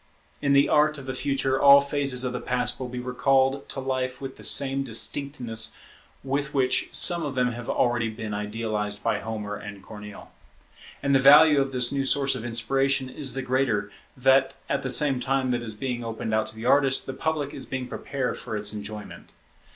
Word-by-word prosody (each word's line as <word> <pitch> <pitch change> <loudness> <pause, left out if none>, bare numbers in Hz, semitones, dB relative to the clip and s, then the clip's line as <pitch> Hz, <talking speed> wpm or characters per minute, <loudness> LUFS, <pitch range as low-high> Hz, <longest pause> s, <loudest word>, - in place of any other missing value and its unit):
In 140 -1 +2
the 140 0 +5
Art 150 0 +3
of 135 - -9
the 130 - -4
Future 135 0 -1
all 140 0 +9
phases 140 -2 +1
of 125 -1 -2
the 125 - -3
Past 125 0 -1
will 130 -1 -5
be 125 - -7
recalled 135 +2 +1
to - - -4
life 130 -1 -3
with 135 -1 -7
the - - -14
same 135 -1 +3
distinctness 120 -2 -1 0.5
with 140 +2 -3
which 130 -2 +1
some 175 -1 +3
of 145 -4 -4
them 125 -1 +1
have 120 0 -8
been - - -2
already 115 -2 0
idealized 105 0 -3
by 115 - 0
Homer 105 -2 -5
and 100 -1 -10
Corneille. 105 -1 -11 0.7
And 140 0 +1
the 135 - +5
value 145 +2 +7
of 135 0 -2
this 125 -2 +2
new 135 -1 -1
source 140 -1 +1
of 125 -4 -5
inspiration 130 +3 0
is 135 -1 -2
the 135 - -3
greater 130 +1 0 0.3
that, 135 +1 +3
at 140 - -1
the 130 - -4
same 135 0 +3
time 130 0 0
that 120 -1 -1
it - - -7
is 110 -1 -5
being 120 +1 -4
opened 110 -1 -4
out 110 0 +1
to 110 - -12
the 110 +1 -8
artist, 135 +1 +3
the 135 - -5
public 150 0 -2
is - - -8
being 130 -1 -4
prepared 130 -1 -4
for 110 - -5
its 105 0 -3
enjoyment. 105 0 -8
130 Hz, 205 wpm, -25 LUFS, 115-135 Hz, 0.7 s, all